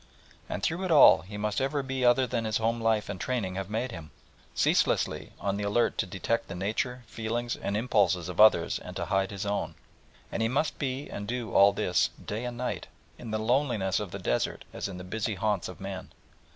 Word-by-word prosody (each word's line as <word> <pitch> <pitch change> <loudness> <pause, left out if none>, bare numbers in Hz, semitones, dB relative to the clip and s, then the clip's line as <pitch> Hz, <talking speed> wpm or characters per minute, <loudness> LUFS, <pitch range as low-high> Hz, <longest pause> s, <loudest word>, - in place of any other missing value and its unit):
And - - -4
through 175 +4 0
it 185 - -2
all 155 -4 +8
he 105 +3 -9
must 105 +3 -1
ever 140 +1 0
be 130 -1 -3
other 125 +1 +5
than 115 -2 -2
his 110 -1 +1
home 115 +1 0
life 110 -2 +2
and 95 -2 -5
training 115 -8 -1
have 95 0 -4
made 115 +4 -2
him. 80 -7 -8 0.5
Ceaselessly - - +1
on 100 0 -1
the 105 - -3
alert 105 +4 +2
to - - +1
detect 100 +5 -1
the - - -6
nature, 110 +6 -2
feelings, 115 +1 -3
and 100 - -2
impulses 100 -6 +2
of 90 +2 +1
others 110 0 +5
and - - -9
to - - -2
hide 95 0 +1
his 100 -1 -5
own. 100 0 -2 0.6
And - - -2
he 110 - +3
must 140 +6 0
be 135 0 -2
and 105 - -6
do 120 -1 -3
all 100 +1 +7
this 90 -2 +1 0.2
day 110 +4 -3
and 120 -1 -5
night, 125 +1 -3 0.3
in 120 - -7
the 110 - -1
loneliness 110 -5 +1
of 105 -2 -4
the 100 - -6
desert - - -1
as - - -3
in 95 -2 -7
the 90 - -7
busy 110 +3 -2
haunts 105 -3 0
of 90 -3 -9
men. 95 -1 -6
110 Hz, 215 wpm, -28 LUFS, 100-120 Hz, 0.6 s, all